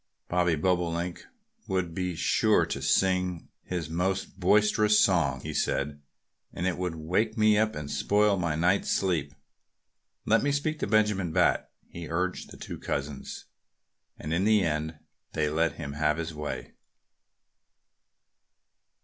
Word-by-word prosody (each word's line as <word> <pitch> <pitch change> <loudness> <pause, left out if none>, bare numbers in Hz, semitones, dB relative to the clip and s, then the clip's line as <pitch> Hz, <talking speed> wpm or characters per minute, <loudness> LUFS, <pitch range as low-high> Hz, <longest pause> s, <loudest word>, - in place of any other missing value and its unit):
"The 90 -2 +2
Bobolink 85 +1 0
person - - -17 0.4
would 90 -3 -1
be 90 0 -2
sure - - +3
to - - -4
sing 90 -2 +1
his 90 -4 -4
most 95 +3 -2
boisterous 105 +2 +4
song," 85 -6 +2
he - - -5
said, 70 +1 -1 0.5
"and 85 - -4
it 90 -2 -1
would 90 -2 -2
wake 95 +8 -1
me 110 -1 +5
up 110 +1 +1
and 75 -1 -5
spoil 100 +9 +2
my 85 -4 -1
night's 90 +5 +2
sleep. 85 -7 0 0.9
Let 115 +1 +4
me 145 - +1
speak 150 +2 -1
to - - -1
Benjamin 105 -4 +2
Bat!" - - +2 0.2
he 85 -2 -8
urged 90 +2 -2
the - - -11
two - - -7
cousins. 70 0 -5 0.7
And 80 - -4
in 90 +3 +1
the 105 -1 +4
end 80 -1 -2 0.4
they 75 -1 0
let 80 -1 +1
him 70 0 -6
have 75 +1 +1
his 85 0 -4
way. 75 -1 -6
90 Hz, 145 wpm, -28 LUFS, 80-100 Hz, 0.9 s, me